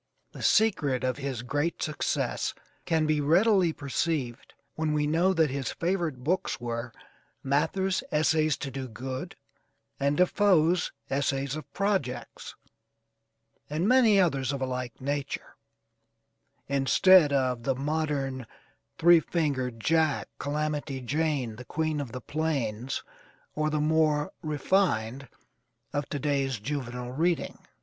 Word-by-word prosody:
The - - -10
secret 145 - +2
of 130 -1 0
his 135 -4 -4
great 145 +6 -1
success 155 -1 -1 0.3
can 160 -2 +2
be 155 -1 +1
readily 180 +4 +4
perceived, 140 -3 -3 0.2
when 155 -1 -1
we 150 -1 +1
know 165 +5 +3
that 160 -6 +2
his 135 -3 -2
favorite 170 -7 -2
books 180 +6 0
were 120 0 -4 0.5
Mather's 185 +8 +1
"Essays 155 0 +2
to 140 - -4
Do 130 0 -5
Good," 130 +3 -6 0.6
and 140 +1 +1
DeFoe's 180 -3 +3 0.2
"Essays 135 0 0
of 155 - -8
Projects," 195 -12 -2 1.1
and 160 +6 0
many 230 -5 +5
others 140 -8 +2
of 140 - -3
a 130 - -1
like 125 -2 -5
nature: 140 +1 -4 1.1
instead 145 +4 +5
of 130 -3 +1
the 135 +2 0
modern 140 -3 -2 0.5
"Three 170 0 +7
Fingered 135 -8 -1
Jack," 160 +3 +1
"Calamity 145 -1 -2
Jane," 135 -3 -1
"The 125 - -9
Queen 155 -2 -1
of 130 -5 -6
the 125 - -6
Plains," 135 -5 -2 0.5
or 155 0 0
the 155 0 0
more 150 -1 +2
'refined' 140 - 0 0.7
of 145 -1 -2
to 145 - -2
day's 135 -3 0
juvenile 125 -1 -4
reading. 165 +5 -1
145 Hz, 125 wpm, -28 LUFS, 130-160 Hz, 1.1 s, Three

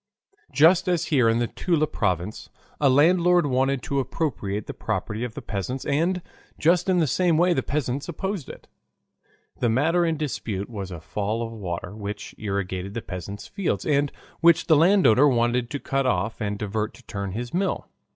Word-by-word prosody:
Just 170 +5 +5
as 175 -3 +1
here 125 -5 +5
in 115 - +2
the 120 - +1
Toula 160 +5 0
province, 95 - -2 0.3
a 140 - +4
landlord 175 +5 +4
wanted 135 -1 +1
to 140 - -1
appropriate 120 -7 -2
the - - -6
property 110 +2 -3
of 125 -3 -5
the - - -7
peasants 105 +6 -4
and 170 +5 0 0.3
just 175 +3 +2
in 185 - +3
the 165 - +3
same 170 +3 +2
way 175 +2 +4
the 130 - +1
peasants 140 +1 -2
opposed 190 -1 -4
it. - - -11 0.9
The 120 - +2
matter 160 +9 +2
in 165 -2 0
dispute 115 -8 -4
was 100 -4 -5
a 85 -3 -7
fall 105 +7 -2
of 115 - -7
water, 90 -2 -5
which 105 -1 -6
irrigated 100 -2 -3
the 115 - -3
peasants' 100 +2 -7
fields, 200 -3 -2
and 145 -1 +2 0.3
which 170 -1 +5
the 160 - +5
landowner 155 - +5
wanted 120 -1 +1
to 145 - -4
cut 135 -1 -1
off 110 +1 -1
and 105 -1 -2
divert 105 +1 -3
to 130 - -17
turn 100 -3 -4
his 120 +3 -5
mill. 190 +3 -1
130 Hz, 180 wpm, -25 LUFS, 105-160 Hz, 0.9 s, Just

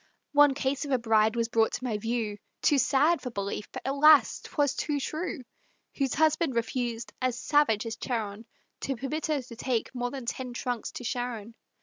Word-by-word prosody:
One 290 -1 +6
case 275 +1 -1
of 290 - -5
a 260 - +3
bride 220 -1 +3
was 230 -1 +1
brought 225 -1 +2
to - - -4
my 225 -5 -1
view, 225 -2 -2 0.2
Too 290 - +4
sad 300 +6 +3
for 250 - -4
belief, 200 -1 -4
but - - -7
alas! 280 -1 +5
'twas 285 -2 0
too 295 -2 -1
true, 310 0 -4 0.5
Whose 275 -3 0
husband 310 -3 +2
refused, 235 0 -2
as 255 -1 0
savage 290 -8 +2
as 225 0 -4
Charon, 220 -2 -4 0.3
To 270 - -2
permit 275 +6 -3
her 300 -4 0
to 235 -1 -11
take 240 0 -2
more 245 -1 -2
than 265 -1 -7
ten 250 +1 -4
trunks 245 -1 -3
to - - -7
Sharon. 235 -2 -3
250 Hz, 190 wpm, -28 LUFS, 230-280 Hz, 0.5 s, One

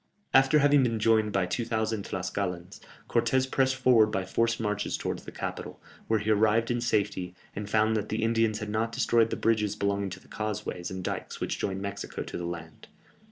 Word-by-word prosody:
After 135 +3 +6
having 145 -1 +5
been 115 -3 +1
joined 110 -1 +3
by 95 -2 +1
2000 110 +1 -1
Tlascalans, 90 -1 -4 0.3
Cortès 130 0 +2
pressed 130 -1 +2
forward 120 -4 +5
by 95 -3 -2
forced 115 +4 0
marches 105 -2 -1
towards - - -4
the - - -8
capital, - - -6 0.3
where 110 - +3
he 105 +1 0
arrived 110 +2 +3
in 120 0 0
safety, 100 -6 -1 0.2
and 105 0 -5
found 110 +1 +3
that 105 -1 -2
the 110 +1 -1
Indians 115 -1 +2
had 105 -1 -5
not 110 +2 -1
destroyed 115 0 +2
the - - -2
bridges 105 -2 +1
belonging 100 -1 -1
to 95 0 -8
the - - -22
causeways 105 -4 -4
and 95 -1 -5
dikes - - -4
which - - -3
joined 95 0 -2
Mexico 100 0 -5
to - - -8
the 85 - -3
land. 80 -2 -8
110 Hz, 195 wpm, -28 LUFS, 100-115 Hz, 0.3 s, After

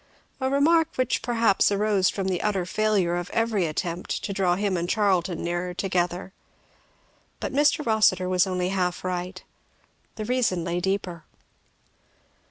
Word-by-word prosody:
A 260 -1 0
remark 315 +4 +3
which 255 -2 0
perhaps 230 -4 +2
arose 200 -2 +2
from 195 -2 -3
the 185 -2 -1
utter 195 -4 0
failure 195 -3 +1
of 175 0 -4
every 225 -6 0
attempt 170 +3 -3
to 200 - -3
draw 185 -2 +1
him 200 0 -1
and 175 0 -2
Charlton 185 -5 +1
nearer 175 +1 -3
together. 180 0 -2 1.1
But - - -4
Mr. 295 +2 +2
Rossitur 215 -5 +3
was 185 +1 +2
only 180 -1 -1
half 180 -2 -1
right. 185 0 -4 0.7
The 215 - -5
reason 235 -8 0
lay 170 +1 -2
deeper. 185 -3 -2
190 Hz, 145 wpm, -25 LUFS, 180-215 Hz, 1.1 s, remark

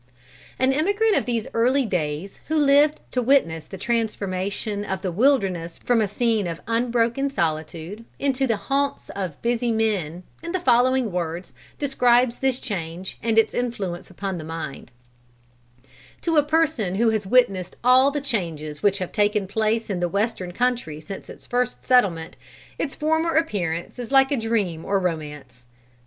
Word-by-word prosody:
An 260 +1 +2
emigrant 405 +9 +2
of - - 0
these 235 -3 -1
early 255 +4 +3
days 175 -2 -3
who 315 - -1
lived 290 0 +4
to 250 - 0
witness 195 - +2
the 190 - -9
transformation 205 -2 -2
of 190 -2 -4
the 185 - -1
wilderness 190 -7 +1
from 240 -2 +1
a 210 - +1
scene 220 -1 0
of 165 -1 -4
unbroken 235 +3 +1
solitude 165 - -3
into 270 -1 0
the 225 -3 +1
haunts 280 +5 -1
of 185 -7 -5
busy 240 0 +1
men, 195 -7 -1 0.2
in 335 +1 -5
the 370 - +1
following 255 - +3
words 175 0 -4 0.2
describes 250 -3 +2
this 265 -1 +1
change 175 -2 -5
and 225 0 0
its 225 -1 +4
influence 200 -8 -3
upon 190 -1 -4
the - - -6
mind: 155 -5 -6 1.3
"To 330 -1 0
a 300 - +7
person 295 - +1
who 225 +2 +3
has 215 -3 -2
witnessed 195 -6 +2
all 255 +2 +6
the 290 0 -3
changes 165 - -3
which 200 -1 +3
have 185 -3 -4
taken 205 -1 +1
place 220 +2 0
in 195 -4 -2
the 175 0 0
western 200 -2 -1
country 240 -8 -1
since 195 +5 -9
its - - -11
first 245 0 -1
settlement, 190 -11 +2 0.4
its 275 - -2
former 320 +2 +1
appearance 185 - -1
is 245 +1 -6
like 270 0 +5
a 280 - +2
dream 210 -8 -1
or 200 0 +1
romance. 150 -8 -5
220 Hz, 160 wpm, -23 LUFS, 180-255 Hz, 1.3 s, a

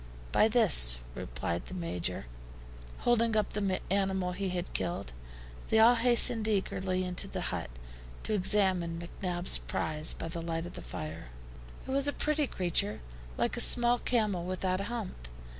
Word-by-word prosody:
"By 215 - +4
this," 185 - +5 0.2
replied 65 +10 -4
the 185 - -7
Major, 165 - -3 0.8
holding 230 -2 +2
up 210 - -1
the 195 -3 -1
animal 190 -2 0
he 190 +1 -3
had 180 0 -4
killed. 135 - -3 0.5
They 220 - +2
all 225 +2 +7
hastened 235 -1 +4
eagerly 190 -3 -1
into 180 -1 -1
the - - -5
hut, - - -4 0.5
to 220 - -2
examine 185 -4 +2
McNabbs' 175 +1 -1
prize 155 0 +1
by - - -6
the 170 0 -5
light 165 0 -3
of 175 - -9
the - - -8
fire. 80 -4 -7 0.6
It - - -4
was 275 +1 +2
a 285 - 0
pretty 300 -1 0
creature, 165 - -1 0.4
like - - 0
a - - +2
small 240 0 +5
camel 210 -7 0
without 185 +1 -2
a - - -4
hump. 215 - -6
185 Hz, 160 wpm, -30 LUFS, 170-220 Hz, 0.8 s, all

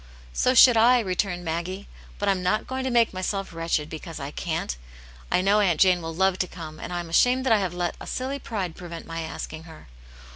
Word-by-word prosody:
"So 255 - +2
should 245 -1 +8
I," 245 +3 +6
returned 185 -3 -2
Maggie, 175 +4 -4 0.3
"but 205 - -2
I'm 195 -2 +2
not 180 +4 0
going 260 0 -4
to - - 0
make 235 -3 +3
myself 190 0 -3
wretched 165 -2 -1
because 160 +1 -8
I 140 +1 -5
can't. 160 - -3 0.6
I - - +3
know 200 +3 +3
Aunt 180 -6 +2
Jane 185 -2 +5
will 165 0 -6
love 190 +1 +2
to 180 - 0
come, 160 -3 -9
and - - -7
I 175 0 -2
am 170 - -9
ashamed 250 +8 +3
that 245 - +4
I 215 - +4
have 185 -3 -2
let 175 -1 -2
a - - -8
silly 265 +2 -3
pride 195 -10 -4
prevent 170 -3 -8
my 165 0 -5
asking 160 0 -6
her. 160 - -14
180 Hz, 225 wpm, -25 LUFS, 165-210 Hz, 0.6 s, should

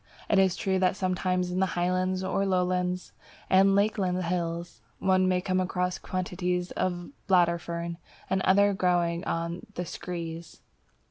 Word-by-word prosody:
It 200 - +5
is 190 -2 +3
true 190 0 0
that 185 0 +2
sometimes 185 -1 0
in 180 - -1
the 190 - +3
Highlands, 185 +1 0
or 190 +1 0
Lowland 180 -1 0 0.4
and 195 +1 +6
Lakeland 195 -3 +1
Hills, 170 0 -3 0.2
one 185 -1 +3
comes 185 0 0
across 180 0 -1
quantities 180 -1 -2
of 180 -1 -1
the 175 +6 -10 0.2
Bladderfern 170 -2 +1 0.3
and 190 0 0
others 200 +1 +4
growing 175 -1 +1
on 170 +1 -3
the 180 - -3
"screes." 170 -1 -6
180 Hz, 140 wpm, -28 LUFS, 175-185 Hz, 0.4 s, and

